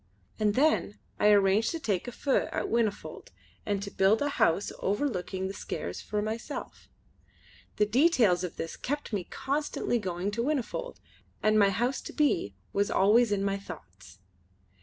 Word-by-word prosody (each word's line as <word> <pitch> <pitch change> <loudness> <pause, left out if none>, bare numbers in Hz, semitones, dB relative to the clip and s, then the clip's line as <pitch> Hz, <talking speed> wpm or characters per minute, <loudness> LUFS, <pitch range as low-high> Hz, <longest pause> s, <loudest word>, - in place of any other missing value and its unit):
And 210 -1 +2
then 280 -7 +2 0.2
I - - +4
arranged 205 +1 +4
to 330 - -3
take 200 - -1
a - - -4
feu 275 +2 0
at - - -2
Whinnyfold 225 -3 -2 0.4
and 200 -1 -1
to 200 - -6
build 195 +3 +3
a 290 - 0
house 195 - +1
overlooking 195 -4 -1
the 195 - -5
Skares - - -5
for 210 -1 -2
myself. 220 +2 -6 0.9
The 210 - +3
details 225 - +3
of 180 - -4
this 165 - -5
kept 290 -3 -4
me 195 -4 -1
constantly 275 -3 -2
going 185 0 -3
to 230 +3 -2
Whinnyfold, 305 - -2 0.4
and 215 0 +4
my 200 -1 +5
house 240 +6 -1
to - - -9
be 190 - +1 0.2
was 200 0 +1
always 215 +4 +4
in 200 -1 +1
my 200 0 0
thoughts. 90 - -12
210 Hz, 160 wpm, -29 LUFS, 195-245 Hz, 0.9 s, my